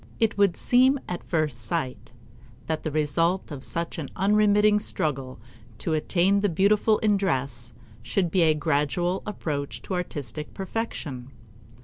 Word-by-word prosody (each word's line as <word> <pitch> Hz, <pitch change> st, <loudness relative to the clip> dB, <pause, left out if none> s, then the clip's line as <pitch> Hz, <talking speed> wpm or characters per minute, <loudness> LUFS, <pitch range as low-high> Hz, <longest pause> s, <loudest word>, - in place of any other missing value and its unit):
It 225 Hz, -2 st, +2 dB
would 200 Hz, -4 st, +3 dB
seem 260 Hz, +3 st, +4 dB
at 180 Hz, -, -5 dB
first 155 Hz, -7 st, -1 dB
sight 125 Hz, +3 st, -4 dB, 0.5 s
that 160 Hz, -1 st, -2 dB
the 155 Hz, -, -3 dB
result 155 Hz, +5 st, 0 dB
of 140 Hz, -3 st, -7 dB
such 170 Hz, 0 st, -3 dB
an 145 Hz, -, -5 dB
unremitting 210 Hz, +1 st, +4 dB
struggle 135 Hz, -, -1 dB, 0.4 s
to 160 Hz, -, -2 dB
attain 180 Hz, +5 st, +2 dB
the 205 Hz, 0 st, +1 dB
beautiful 205 Hz, +5 st, +3 dB
in 210 Hz, -1 st, +4 dB
dress 130 Hz, -10 st, -2 dB, 0.3 s
should 170 Hz, -, -1 dB
be 185 Hz, -, +3 dB
a 160 Hz, -2 st, +4 dB
gradual 160 Hz, +4 st, 0 dB
approach 140 Hz, -, -4 dB
to -, -, -5 dB
artistic 150 Hz, -6 st, -4 dB
perfection. 175 Hz, -, -4 dB
170 Hz, 140 wpm, -26 LUFS, 145-200 Hz, 0.5 s, seem